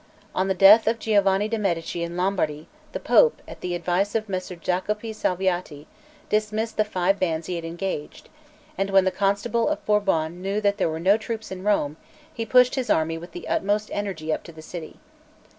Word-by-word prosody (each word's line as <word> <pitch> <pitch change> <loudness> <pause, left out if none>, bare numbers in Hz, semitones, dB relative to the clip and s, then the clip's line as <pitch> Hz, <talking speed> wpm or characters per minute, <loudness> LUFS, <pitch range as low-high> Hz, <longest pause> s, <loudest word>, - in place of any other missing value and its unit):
On 185 - 0
the 190 - 0
death 205 +4 +7
of 230 +1 +2
Giovanni 205 -2 +2
de' 225 0 -2
Medici 170 -4 -2
in 170 +1 -4
Lombardy, 170 -5 -1 0.2
the - - -4
Pope, 480 -1 +4
at - - -11
the 180 -1 -2
advice 180 +4 0
of 220 -1 0
Messer 185 -2 -4
Jacopo 205 +6 -2
Salviati, 180 -7 -2 0.4
dismissed 215 +1 -1
the 215 - +4
five 195 -1 0
bands 165 -3 -1
he 180 - -4
had 170 - -4
engaged; 170 -2 -5 0.5
and 195 0 0
when 195 -1 +4
the 190 - +2
Constable 200 +6 0
of 305 - -3
Bourbon 180 -5 +1
knew 195 +2 -1
there 200 -4 +1
were 160 0 -4
no 190 +5 +4
troops 220 -1 -6
in 185 -1 -6
Rome, 160 -8 +1 0.4
he 225 -1 -4
pushed 250 +2 +5
his 260 -2 -2
army 165 +1 +1
with 175 +1 -11
the 175 - -8
utmost 205 +2 0
energy 185 -6 -2
up - - -3
to 170 - -10
the 160 -1 -13
city. 165 -1 -8
195 Hz, 195 wpm, -24 LUFS, 175-210 Hz, 0.5 s, death